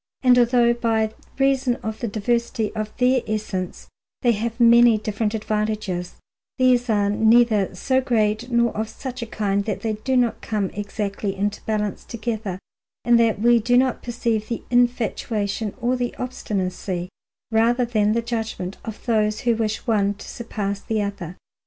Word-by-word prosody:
And 250 Hz, -1 st, +6 dB
although 240 Hz, 0 st, +4 dB
by 225 Hz, -2 st, 0 dB, 0.2 s
reason 270 Hz, -2 st, +2 dB
of 220 Hz, 0 st, -4 dB
the 235 Hz, -, -2 dB
diversity 230 Hz, +2 st, -1 dB
of 215 Hz, 0 st, -3 dB
their 255 Hz, 0 st, +3 dB
essence 210 Hz, -4 st, -4 dB, 0.4 s
they 240 Hz, -, +5 dB
have 230 Hz, +2 st, -3 dB
many 235 Hz, -1 st, +7 dB
different 215 Hz, +1 st, -2 dB
advantages, 210 Hz, -4 st, -2 dB, 0.4 s
these 250 Hz, -1 st, +3 dB
are 205 Hz, -2 st, +2 dB
neither 220 Hz, -3 st, +3 dB
so 260 Hz, +7 st, +1 dB
great 225 Hz, -2 st, 0 dB
nor 235 Hz, -1 st, +2 dB
of 220 Hz, +1 st, -2 dB
such 255 Hz, +2 st, -7 dB
a 235 Hz, -, -4 dB
kind 200 Hz, -2 st, -1 dB
that 205 Hz, -3 st, -3 dB
they 220 Hz, 0 st, -1 dB
do 255 Hz, +5 st, -1 dB
not 240 Hz, -2 st, +1 dB
come 210 Hz, -4 st, -2 dB
exactly 205 Hz, -1 st, -3 dB
into 205 Hz, +2 st, -2 dB
balance 210 Hz, -2 st, -1 dB
together 220 Hz, -5 st, -4 dB, 0.5 s
and 240 Hz, -1 st, +5 dB
that 230 Hz, -3 st, +2 dB
we 240 Hz, +1 st, +5 dB
do 245 Hz, +3 st, +2 dB
not 255 Hz, -1 st, +2 dB
perceive 230 Hz, -3 st, -2 dB
the 235 Hz, -, -4 dB
infatuation 225 Hz, -4 st, 0 dB
or 245 Hz, +1 st, +1 dB
the 245 Hz, -1 st, -3 dB
obstinacy, 185 Hz, -7 st, -3 dB, 0.4 s
rather 235 Hz, +3 st, +3 dB
than 215 Hz, -3 st, +1 dB
the 230 Hz, +1 st, 0 dB
judgment, 225 Hz, -5 st, -4 dB
of 220 Hz, -1 st, -8 dB
those 215 Hz, -2 st, +1 dB
who 240 Hz, -1 st, +2 dB
wish 220 Hz, -1 st, -2 dB
one 205 Hz, -3 st, +1 dB
to -, -, -11 dB
surpass 205 Hz, -4 st, -4 dB
the 220 Hz, -1 st, -2 dB
other. 190 Hz, -3 st, -5 dB
220 Hz, 160 wpm, -23 LUFS, 210-240 Hz, 0.5 s, many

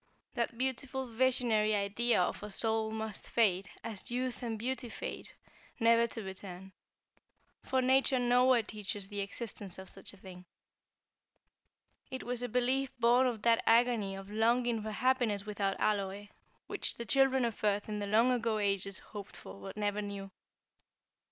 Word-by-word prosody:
That 235 Hz, 0 st, -2 dB
beautiful 265 Hz, +1 st, -1 dB
visionary 230 Hz, -3 st, +2 dB
idea 205 Hz, +4 st, +2 dB
of 180 Hz, -, 0 dB
a 210 Hz, -, -6 dB
soul 220 Hz, +1 st, 0 dB
must 220 Hz, -1 st, -5 dB
fade, 195 Hz, -4 st, +2 dB
as 220 Hz, -4 st, -5 dB
youth 250 Hz, +1 st, -2 dB
and 230 Hz, -2 st, -3 dB
beauty 250 Hz, +2 st, -3 dB
fade, -, -, -6 dB, 0.5 s
never 230 Hz, +1 st, +5 dB
to 225 Hz, -1 st, -6 dB
return; 190 Hz, -1 st, -8 dB, 0.9 s
for 260 Hz, -1 st, 0 dB
Nature 265 Hz, +1 st, +4 dB
nowhere 245 Hz, 0 st, +4 dB
teaches 205 Hz, -2 st, -5 dB
the 205 Hz, -1 st, -4 dB
existence 200 Hz, -2 st, -4 dB
of 190 Hz, 0 st, -9 dB
such 195 Hz, -, -6 dB
a 200 Hz, -, -16 dB
thing. 185 Hz, -1 st, -12 dB, 1.6 s
It 260 Hz, -, -5 dB
was 245 Hz, 0 st, -3 dB
a 245 Hz, -, -2 dB
belief 255 Hz, +3 st, +1 dB
born 245 Hz, +2 st, +5 dB
of 230 Hz, -4 st, -3 dB
that 230 Hz, -1 st, +4 dB
agony 230 Hz, -4 st, +3 dB
of 195 Hz, +1 st, -9 dB
longing 230 Hz, +1 st, +2 dB
for 215 Hz, -, -4 dB
happiness 225 Hz, -3 st, +1 dB
without 200 Hz, -2 st, -1 dB
alloy, 200 Hz, -1 st, -1 dB, 0.4 s
which -, -, -3 dB
the 235 Hz, -, -5 dB
children 265 Hz, +1 st, +3 dB
of 230 Hz, -2 st, -4 dB
earth 205 Hz, -1 st, +1 dB
in 210 Hz, -1 st, -3 dB
the 205 Hz, -, -3 dB
long 225 Hz, +5 st, +4 dB
ago 230 Hz, -3 st, +1 dB
ages 195 Hz, -2 st, 0 dB
hoped 205 Hz, -2 st, -10 dB
for, 195 Hz, -, -11 dB
but 195 Hz, +1 st, -8 dB
never 205 Hz, 0 st, 0 dB
knew. 200 Hz, -1 st, -6 dB
220 Hz, 160 wpm, -32 LUFS, 200-245 Hz, 1.6 s, never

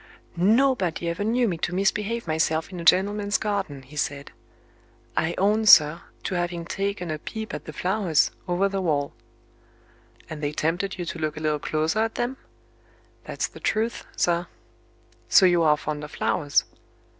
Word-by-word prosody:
"Nobody 195 Hz, -3 st, +2 dB
ever 170 Hz, +4 st, -2 dB
knew 235 Hz, +3 st, +2 dB
me 170 Hz, -5 st, -2 dB
to 175 Hz, +1 st, -2 dB
misbehave 210 Hz, +4 st, 0 dB
myself 160 Hz, +1 st, 0 dB
in 180 Hz, -, -7 dB
a -, -, -5 dB
gentleman's 200 Hz, +3 st, +3 dB
garden," 200 Hz, -11 st, -3 dB
he 135 Hz, +4 st, -15 dB
said; 145 Hz, -1 st, -3 dB, 0.8 s
"I 165 Hz, +2 st, 0 dB
own, 210 Hz, +3 st, +2 dB
sir, 155 Hz, -2 st, +7 dB, 0.2 s
to -, -, -3 dB
having 175 Hz, -1 st, -2 dB
taken 195 Hz, -2 st, -3 dB
a 155 Hz, -, -4 dB
peep 220 Hz, +6 st, -6 dB
at -, -, -6 dB
the -, -, -7 dB
flowers, 180 Hz, -1 st, +1 dB, 0.2 s
over 180 Hz, +2 st, +2 dB
the 195 Hz, -1 st, -2 dB
wall." 145 Hz, -5 st, 0 dB, 1.1 s
"And 155 Hz, -1 st, -7 dB
they 145 Hz, 0 st, -2 dB
tempted 175 Hz, +6 st, -1 dB
you 175 Hz, -, -4 dB
to 170 Hz, -, -5 dB
look 155 Hz, -1 st, -2 dB
a -, -, -3 dB
little 155 Hz, -1 st, 0 dB
closer 155 Hz, +7 st, -1 dB
at 225 Hz, 0 st, 0 dB
them?" 245 Hz, +2 st, -2 dB, 0.9 s
"That's -, -, -2 dB
the -, -, -13 dB
truth, 225 Hz, +2 st, -1 dB
sir." 175 Hz, 0 st, +1 dB, 0.8 s
"So 190 Hz, -, +7 dB
you 175 Hz, -2 st, +4 dB
are 150 Hz, -2 st, +4 dB
fond 150 Hz, 0 st, -4 dB
of 150 Hz, -, -7 dB
flowers?" 145 Hz, -1 st, +1 dB
175 Hz, 170 wpm, -25 LUFS, 155-205 Hz, 1.1 s, sir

